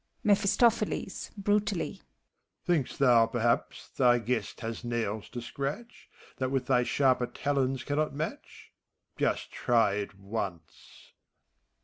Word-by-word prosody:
MEPHiSTOPHELES 210 0 +2
(brutdlly), 205 -2 0 0.6
Think'st 165 -7 0
thou, 120 -4 +5
perhaps, 120 0 0
thy 120 -2 +4
guest 115 -2 -2
has 115 0 -5
nails 115 -3 -2
to 120 - -6
scrateh, 140 - -5 0.3
That 130 -1 -1
with 135 -1 -1
thy 125 -1 +3
sharper 130 -1 +2
talons 135 -2 -1
cannot 150 +2 0
match 155 +2 -6 0.4
f - - -26
Just - - 0
try 115 -4 +2
it 100 -1 -4
once 100 -5 -7
125 Hz, 115 wpm, -29 LUFS, 115-150 Hz, 0.6 s, thou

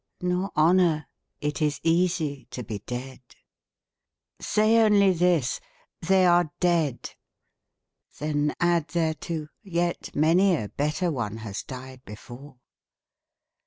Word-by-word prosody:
Nor 180 +2 -1
honour. 165 -1 +3 0.4
It 150 +2 -3
is 150 -1 0
easy 165 -5 0
to 125 - -6
be 105 -1 -5
dead. 125 +1 -6 1.2
Say 215 +2 +3
only 205 -3 +5
this, 175 -7 +1 0.2
" - - -41
They 190 0 +5
are 175 -3 +3
dead." 165 -7 0 1.1
Then 150 0 -1
add 175 -2 +2
thereto, 160 -1 -2
" - - -56
Yet 175 -4 -3
many 175 +5 +4
a 105 -9 -4
better 155 +5 -1
one 115 -6 -3
has 100 -2 -4
died 130 0 -10
before." 125 +6 -12
160 Hz, 120 wpm, -26 LUFS, 140-180 Hz, 1.2 s, only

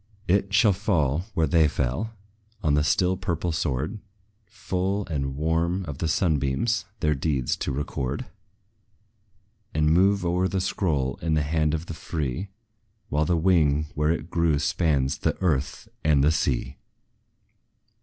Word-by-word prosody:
It 95 +2 +2
shall 105 0 +5
fall 85 - 0
where 80 - +3
they 80 +1 +4
fell, 85 - -2 0.5
on 75 -3 +2
the 75 0 +3
still 90 +4 +2
purple 85 -2 -2
sward, 75 - -2 0.5
Full 100 -2 -2
and 70 -4 -3
warm 80 +5 0
with 75 -5 -7
the 80 - 0
sunbeams 80 - +1 0.2
their 75 -2 +3
deeds 70 -3 0
to - - -2
record; 65 -2 -3 1.5
And 75 0 +3
move 95 +2 +3
o'er 90 +2 +1
the 95 - -1
scroll 80 -8 -1
in 80 -1 +1
the 75 - +2
hand 75 +1 +1
of 80 +1 -5
the 85 - -6
free, 80 +3 -4 0.6
While 75 +1 +1
the 85 0 +2
wing 75 -4 +2
where 75 0 0
it 85 +1 -2
grew 85 -3 +2
spans 80 -6 +1
the - - 0
earth 75 -7 -1 0.2
and 75 -3 +4
the 75 - +5
sea. 65 -3 -1
80 Hz, 145 wpm, -25 LUFS, 75-90 Hz, 1.5 s, shall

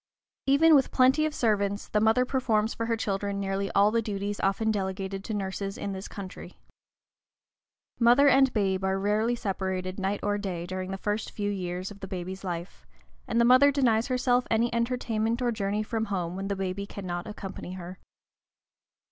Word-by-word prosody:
Even 305 +4 +6
with 275 -3 +5
plenty 265 +5 +4
of 305 - -6
servants, 205 -3 0
the 210 - +1
mother 225 +3 +4
performs 230 -5 +1
for 230 - -3
her 230 -1 0
children 200 -1 -2
nearly 195 0 -2
all 200 +1 +5
the 230 +1 +2
duties 205 -1 -3
often 210 +3 +1
delegated 195 -1 -3
to 220 - -4
nurses 195 0 -3
in 200 - -4
this 190 +1 -6
country. 195 -3 -9 1.4
Mother 245 +4 +6
and 270 -1 +5
babe 195 -4 0
are 190 0 +1
rarely 210 +4 +1
separated, 190 -3 -3
night 195 +1 -1
or 205 0 0
day, 180 -4 -4
during 185 +1 -4
the 195 - -3
first 210 +2 -2
few 205 -1 -3
years 185 0 -4
of 200 - -11
the 195 - -7
baby's 185 +1 -6
life, 175 -1 -6 0.4
and 230 - +1
the 235 - +5
mother 255 +4 +7
denies 240 -5 +2
herself 250 -1 +1
any 230 +1 +1
entertainment 235 -1 0
or 245 -1 +1
journey 210 -1 -1
from 220 +1 -2
home 180 -4 -3
when 195 +1 -4
the 200 - -1
baby 195 +1 -3
cannot 175 -4 -5
accompany 195 -3 -7
her. 180 0 -8
205 Hz, 180 wpm, -28 LUFS, 190-230 Hz, 1.4 s, mother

